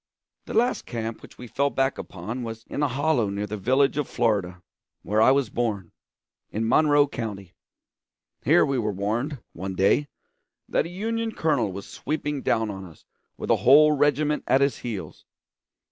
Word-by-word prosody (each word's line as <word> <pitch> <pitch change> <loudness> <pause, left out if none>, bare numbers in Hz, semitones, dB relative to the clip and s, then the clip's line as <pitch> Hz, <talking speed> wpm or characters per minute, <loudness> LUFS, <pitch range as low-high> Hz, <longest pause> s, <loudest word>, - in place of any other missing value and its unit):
The - - -5
last 240 +3 +1
camp 115 -1 -4
which - - -14
we 125 - -9
fell 140 +4 0
back 135 -1 0
upon 105 +8 -6
was 115 -1 -6
in - - -4
a 145 - +3
hollow 135 -4 +1
near 100 +1 -3
the 105 +1 -5
village 130 +7 +2
of 150 - -1
Florida, 100 -7 0 0.4
where 105 +2 +1
I 110 - +6
was 135 -4 +2
born 105 -7 -2 0.6
in 110 +1 -2
Monroe 145 +2 +4
County. 100 -8 -6 0.9
Here 155 +8 +5
we 135 -3 0
were 105 -2 -1
warned, 110 +9 -2 0.2
one 95 +2 -5
day, 100 +10 +3 0.6
that - - 0
a - - -9
Union 225 +4 -3
colonel 140 - +1
was 100 +2 -7
sweeping 150 -1 -3
down 110 -3 0
on 95 -1 -7
us 85 -4 -14 0.3
with - - -2
a - - +5
whole 150 +4 +6
regiment 150 +1 +1
at 130 +2 +4
his 140 0 +1
heels. 100 -10 -6
120 Hz, 175 wpm, -25 LUFS, 105-145 Hz, 0.9 s, I